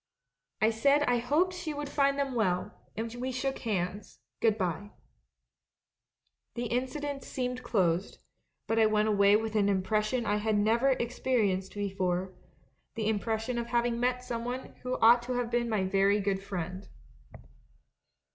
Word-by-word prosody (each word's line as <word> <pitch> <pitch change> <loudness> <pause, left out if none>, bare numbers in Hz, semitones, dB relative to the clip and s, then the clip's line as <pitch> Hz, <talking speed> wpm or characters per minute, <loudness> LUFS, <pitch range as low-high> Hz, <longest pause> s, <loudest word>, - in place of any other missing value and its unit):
I 220 - +5
said 280 +6 +3
I 245 -3 +2
hoped 310 +10 +1
she 345 -4 -5
would 290 0 -4
find 280 0 +1
them 275 -2 -1
well; 185 -6 0 0.3
and 225 +1 -3
we 250 +2 -3
shook 265 +1 -2
hands 200 -2 -3
— - - -58
'Good 220 -2 +3
bye.' 190 +1 -2 1.7
The 240 - -2
incident 275 +4 -2
seemed 250 -1 -3
closed, 185 -6 0 0.5
but 225 0 +1
I 220 - +6
went 215 0 +2
away 200 -1 +5
with 220 0 -1
an 205 -1 +3
impression 215 +5 0
I 210 0 +1
had 215 0 0
never 230 +6 +3
experienced 230 -7 0
before 190 -2 -2 0.3
— - - -41
the 220 -2 -1
impression 220 +3 -1
of 235 - -4
having 240 0 0
met 250 +1 0
someone 245 +1 -4
who 255 0 -2
ought 235 +2 +7
to 250 +1 -4
have 245 -1 -2
been 235 0 0
my 215 -4 +1
very 195 +2 +3
good 195 -1 -1
friend. 185 0 -5
225 Hz, 155 wpm, -30 LUFS, 200-250 Hz, 1.7 s, ought